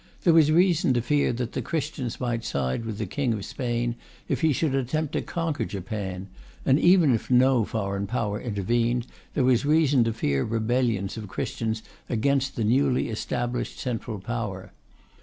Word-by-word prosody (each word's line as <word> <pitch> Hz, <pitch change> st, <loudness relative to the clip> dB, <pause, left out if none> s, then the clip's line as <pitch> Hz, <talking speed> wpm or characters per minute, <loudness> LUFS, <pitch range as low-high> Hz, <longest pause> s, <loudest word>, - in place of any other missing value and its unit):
There 170 Hz, -, +5 dB
was 155 Hz, -2 st, +6 dB
reason 170 Hz, -5 st, +3 dB
to 120 Hz, -, +2 dB
fear 145 Hz, +3 st, +2 dB
that 120 Hz, 0 st, -3 dB
the -, -, -3 dB
Christians 145 Hz, -6 st, -3 dB
might 120 Hz, -2 st, -2 dB
side 70 Hz, -, -2 dB
with 110 Hz, -2 st, -4 dB
the 110 Hz, -, -2 dB
King 125 Hz, +5 st, -1 dB
of 100 Hz, -, -5 dB
Spain 120 Hz, -1 st, -2 dB, 0.3 s
if -, -, -1 dB
he 160 Hz, -1 st, +4 dB
should 145 Hz, +1 st, 0 dB
attempt 135 Hz, +3 st, -1 dB
to -, -, 0 dB
conquer 160 Hz, -7 st, -2 dB
Japan; 95 Hz, -2 st, -5 dB, 0.4 s
and 135 Hz, +2 st, +4 dB
even 175 Hz, -6 st, +5 dB
if 115 Hz, -, -2 dB
no 125 Hz, -2 st, +4 dB
foreign 100 Hz, -2 st, -2 dB
power 105 Hz, -2 st, -2 dB
intervened, 115 Hz, +2 st, 0 dB, 0.3 s
there 140 Hz, -, +2 dB
was 125 Hz, -1 st, +3 dB
reason 145 Hz, -4 st, +4 dB
to 115 Hz, -, +1 dB
fear 70 Hz, -11 st, 0 dB
rebellions 115 Hz, -2 st, 0 dB
of 110 Hz, -2 st, -6 dB
Christians 110 Hz, +3 st, -3 dB, 0.3 s
against 135 Hz, +3 st, +1 dB
the 115 Hz, -, -1 dB
newly 125 Hz, +4 st, +2 dB
established 120 Hz, +2 st, -3 dB
central 115 Hz, -3 st, -3 dB
power. 105 Hz, -3 st, -4 dB
120 Hz, 170 wpm, -26 LUFS, 110-135 Hz, 0.4 s, was